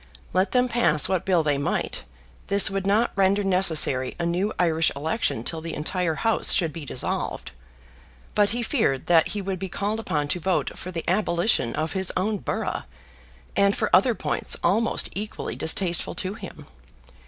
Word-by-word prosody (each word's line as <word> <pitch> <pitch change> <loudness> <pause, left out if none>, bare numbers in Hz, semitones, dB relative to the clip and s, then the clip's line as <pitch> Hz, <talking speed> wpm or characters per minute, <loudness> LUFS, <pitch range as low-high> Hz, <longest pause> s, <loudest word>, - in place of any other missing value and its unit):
Let 185 +2 +1
them 250 0 +3
pass 225 - +2
what 190 -2 -1
bill 180 -4 +2
they 145 -2 +1
might, 140 - -2 0.4
this 200 0 +2
would 195 0 -2
not 215 +4 +2
render 195 +1 +2
necessary 160 -9 +2
a 170 - -1
new 180 +5 0
Irish 165 -2 +2
election 150 - -1
till 160 +5 -2
the 165 0 -5
entire 165 +1 -1
House 225 +5 +3
should 165 -5 +1
be 160 -1 -7
dissolved. - - -3 0.8
But 205 -1 +3
he 240 +1 -1
feared 215 - 0
that 165 -2 +4
he 205 -1 -4
would 190 -1 -3
be 190 0 -5
called 205 +4 -2
upon 150 -9 -2
to 180 - 0
vote 185 +2 -1
for 185 - -7
the 170 -3 -5
abolition 175 - +1
of 155 +1 -2
his 190 -1 -1
own 205 +3 0
borough, - - -3 0.7
and 200 0 +3
for - - +2
other 250 -3 +4
points - - -1
almost 230 +4 +1
equally 210 +2 -5
distasteful 170 +1 +1
to 185 +2 -2
him. 220 - -10
185 Hz, 175 wpm, -24 LUFS, 160-205 Hz, 0.8 s, that